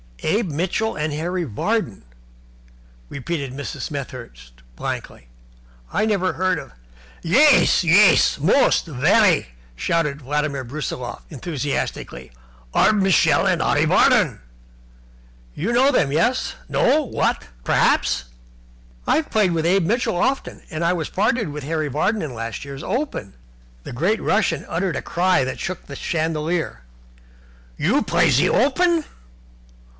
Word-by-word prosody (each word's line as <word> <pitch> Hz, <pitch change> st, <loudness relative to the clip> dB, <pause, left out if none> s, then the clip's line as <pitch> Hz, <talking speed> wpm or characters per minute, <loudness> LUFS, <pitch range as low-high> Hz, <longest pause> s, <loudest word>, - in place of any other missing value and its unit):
"Abe 205 Hz, +4 st, 0 dB
Mitchell 185 Hz, +8 st, -1 dB
and 150 Hz, 0 st, -2 dB
Harry 175 Hz, +4 st, -2 dB
Vardon?" 155 Hz, -, -2 dB, 1.1 s
repeated 140 Hz, -1 st, -4 dB
Mrs. 140 Hz, +1 st, -6 dB
Smethurst, 125 Hz, -, -8 dB, 0.2 s
blankly. -, -, -6 dB, 0.6 s
"I -, -, +1 dB
never 195 Hz, -4 st, 0 dB
heard 185 Hz, 0 st, 0 dB
of -, -, -9 dB, 0.3 s
" -, -, -25 dB
"Yais! 265 Hz, -, +5 dB
Yais! 180 Hz, +2 st, +5 dB
Most! 190 Hz, -, +3 dB
Very!" 170 Hz, -, +3 dB, 0.3 s
shouted 150 Hz, -, -1 dB
Vladimir 145 Hz, 0 st, -2 dB
Brusiloff, 125 Hz, -2 st, -5 dB
enthusiastically. 140 Hz, -, -4 dB, 0.4 s
"Arbmishel 195 Hz, -4 st, +3 dB
and -, -, +1 dB
Arreevadon. -, -, +3 dB, 1.2 s
You 200 Hz, +9 st, -2 dB
know 260 Hz, +4 st, +4 dB
them, 150 Hz, -, +1 dB
yes, 170 Hz, -, +1 dB, 0.2 s
what, 310 Hz, -, +1 dB
no, -, -, -16 dB, 0.2 s
perhaps?" 60 Hz, -, +2 dB, 0.8 s
"I've 315 Hz, -, +1 dB
played 210 Hz, -4 st, +2 dB
with 165 Hz, -1 st, -1 dB
Abe 180 Hz, +1 st, +2 dB
Mitchell 230 Hz, -2 st, 0 dB
often, 270 Hz, +9 st, -1 dB
and 160 Hz, 0 st, -4 dB
I 170 Hz, +1 st, +2 dB
was 165 Hz, -4 st, -3 dB
partnered 210 Hz, +1 st, 0 dB
with 150 Hz, -1 st, -7 dB
Harry 155 Hz, 0 st, -2 dB
Vardon 185 Hz, -, 0 dB
in 145 Hz, -5 st, -5 dB
last 115 Hz, -1 st, -5 dB
year's 140 Hz, -1 st, -8 dB
Open." 230 Hz, -, -3 dB, 0.5 s
The -, -, -8 dB
great 185 Hz, -, 0 dB
Russian 185 Hz, -7 st, 0 dB
uttered 180 Hz, 0 st, -2 dB
a -, -, -3 dB
cry 180 Hz, -2 st, +1 dB
that 130 Hz, -, -4 dB
shook 185 Hz, -1 st, -5 dB
the 140 Hz, -, -9 dB
chandelier. 160 Hz, -, -2 dB, 1.0 s
"You -, -, +2 dB
play -, -, +2 dB
in -, -, +3 dB
ze -, -, +3 dB
Open? 325 Hz, +5 st, +2 dB
165 Hz, 130 wpm, -21 LUFS, 140-205 Hz, 1.2 s, Yais